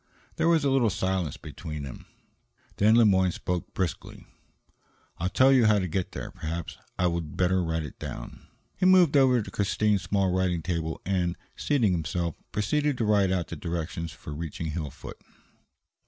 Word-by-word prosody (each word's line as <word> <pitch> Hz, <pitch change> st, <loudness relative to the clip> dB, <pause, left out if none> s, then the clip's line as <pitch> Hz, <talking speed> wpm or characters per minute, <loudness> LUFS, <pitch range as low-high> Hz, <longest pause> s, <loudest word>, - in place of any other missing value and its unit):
There -, -, +2 dB
was 165 Hz, -3 st, +4 dB
a 140 Hz, -, +2 dB
little 130 Hz, -4 st, +3 dB
silence 95 Hz, -6 st, -1 dB
between 75 Hz, -2 st, -7 dB
them. 65 Hz, -3 st, -9 dB, 0.7 s
Then 110 Hz, +2 st, +5 dB
Le 115 Hz, -1 st, +6 dB
Moyne 95 Hz, -3 st, +4 dB
spoke 90 Hz, 0 st, -3 dB
briskly: 90 Hz, -5 st, -4 dB, 0.9 s
"I'll 90 Hz, +2 st, 0 dB
tell 130 Hz, +7 st, +5 dB
you 125 Hz, -4 st, +5 dB
how 105 Hz, -1 st, +5 dB
to 95 Hz, -2 st, 0 dB
get 90 Hz, +2 st, -3 dB
there; -, -, -6 dB
perhaps 80 Hz, +1 st, -5 dB, 0.2 s
I 90 Hz, -, +1 dB
would 85 Hz, -3 st, -2 dB
better 95 Hz, 0 st, +2 dB
write 80 Hz, -1 st, -1 dB
it." 75 Hz, -, -9 dB, 0.7 s
He 185 Hz, -, +3 dB
moved 180 Hz, -5 st, +6 dB
over 130 Hz, -4 st, +5 dB
to -, -, -9 dB
Christine's 105 Hz, 0 st, +1 dB
small 95 Hz, -1 st, +1 dB
writing 90 Hz, -3 st, 0 dB
table 80 Hz, -2 st, -2 dB
and, 90 Hz, -2 st, 0 dB, 0.2 s
seating 125 Hz, -9 st, +1 dB
himself, 85 Hz, 0 st, -1 dB, 0.2 s
proceeded 145 Hz, +7 st, 0 dB
to 115 Hz, -, 0 dB
write 100 Hz, -3 st, +3 dB
out 90 Hz, -3 st, -1 dB
the -, -, -5 dB
directions 85 Hz, 0 st, -4 dB
for 75 Hz, -, -9 dB
reaching 80 Hz, +1 st, -4 dB
Hillfoot. 75 Hz, -4 st, -6 dB
95 Hz, 170 wpm, -27 LUFS, 85-110 Hz, 0.9 s, Le